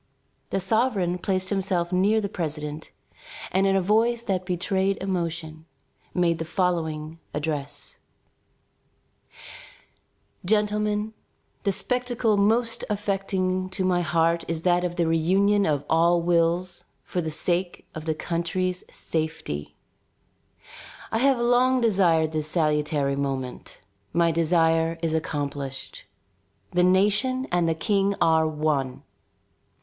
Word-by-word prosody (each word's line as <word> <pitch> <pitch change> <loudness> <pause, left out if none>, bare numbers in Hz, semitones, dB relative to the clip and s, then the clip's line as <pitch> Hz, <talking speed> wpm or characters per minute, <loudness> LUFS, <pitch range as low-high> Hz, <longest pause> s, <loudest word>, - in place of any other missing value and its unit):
The - - 0
sovereign 190 -3 +1
placed 185 0 -1
himself 185 -3 0
near 200 +4 +3
the 205 - -2
president, 155 -5 -5 0.6
and 190 +1 +2
in 195 - +3
a 195 - +3
voice 230 +4 +2
that 185 -4 -2
betrayed 190 +2 0
emotion, 165 -4 -4 0.4
made 170 -2 +1
the - - -1
following 165 -2 -2 0.2
address: 150 -2 -4 2.4
"Gentlemen, 210 +1 +1 0.5
the 200 - +3
spectacle 240 +2 0
most 230 +3 +2
affecting 195 -2 -1
to 185 0 -3
my 180 -1 +2
heart 165 0 +1
is 165 0 -3
that 175 -1 +3
of 175 -1 -2
the 170 - +1
reunion 190 +5 +3
of 145 -2 0
all 170 +2 +4
wills 170 +1 +1 0.2
for 180 - -2
the 160 - -3
sake 175 +3 -2
of 155 0 -7
the 160 -1 0
country's 180 +3 -2
safety. 155 - -4 1.4
I 225 - +1
have 270 +1 +4
long 245 +2 +3
desired 180 -8 +3
this 155 -1 -1
salutary 150 -3 +1
moment; 135 -2 -4 0.3
my 170 -1 +3
desire 165 0 +2
is 160 -1 0
accomplished. 145 - -4 0.7
The 180 -1 +2
nation 210 +8 +3
and 175 -1 +2
the 165 - +1
King 200 +3 +1
are 160 -1 +4
one. 150 -4 -1
175 Hz, 120 wpm, -25 LUFS, 160-200 Hz, 2.4 s, all